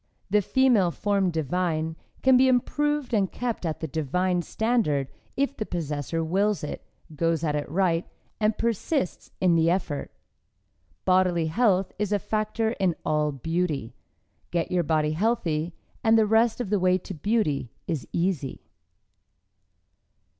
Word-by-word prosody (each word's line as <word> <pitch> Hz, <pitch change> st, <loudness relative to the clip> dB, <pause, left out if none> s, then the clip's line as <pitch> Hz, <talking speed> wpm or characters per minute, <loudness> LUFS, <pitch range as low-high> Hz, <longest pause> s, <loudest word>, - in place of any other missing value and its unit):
The 210 Hz, 0 st, +4 dB
"female 240 Hz, -4 st, +3 dB
form 200 Hz, +1 st, +1 dB
divine" 160 Hz, 0 st, -1 dB, 0.3 s
can 265 Hz, -1 st, +6 dB
be 260 Hz, +1 st, +6 dB
improved 295 Hz, +2 st, +1 dB
and 200 Hz, -4 st, +2 dB
kept 235 Hz, -7 st, -3 dB
at 155 Hz, -, -4 dB
the 160 Hz, -, -2 dB
"divine" 175 Hz, +5 st, 0 dB
standard 175 Hz, -, 0 dB, 0.3 s
if 280 Hz, 0 st, 0 dB
the -, -, -2 dB
possessor 165 Hz, -3 st, -3 dB
wills 195 Hz, +4 st, +1 dB
it, 150 Hz, -, -5 dB, 0.3 s
goes 165 Hz, +1 st, 0 dB
at 150 Hz, -2 st, 0 dB
it 145 Hz, -2 st, -3 dB
right 170 Hz, 0 st, +1 dB, 0.3 s
and 215 Hz, 0 st, +1 dB
persists 235 Hz, -, -1 dB
in 180 Hz, -2 st, +4 dB
the 165 Hz, 0 st, +4 dB
effort. 170 Hz, -5 st, -1 dB, 1.0 s
Bodily 185 Hz, -3 st, +3 dB
health 195 Hz, +2 st, +2 dB
is 210 Hz, -1 st, -1 dB
a 205 Hz, -, +3 dB
factor 215 Hz, +2 st, -1 dB
in 185 Hz, -4 st, +2 dB
all 150 Hz, -1 st, +1 dB
beauty. 155 Hz, -3 st, -2 dB, 0.6 s
Get 170 Hz, -1 st, -1 dB
your 180 Hz, -1 st, +2 dB
body 155 Hz, -1 st, +1 dB
healthy, 170 Hz, -4 st, 0 dB, 0.3 s
and 225 Hz, 0 st, +5 dB
the 220 Hz, -, +5 dB
rest 225 Hz, +2 st, +3 dB
of 225 Hz, -5 st, -3 dB
the 205 Hz, -, +3 dB
way 185 Hz, 0 st, +3 dB
to 185 Hz, -, -8 dB
beauty 155 Hz, -, 0 dB, 0.2 s
is 160 Hz, -6 st, -3 dB
easy. 170 Hz, -7 st, -1 dB
180 Hz, 145 wpm, -26 LUFS, 160-215 Hz, 1.0 s, can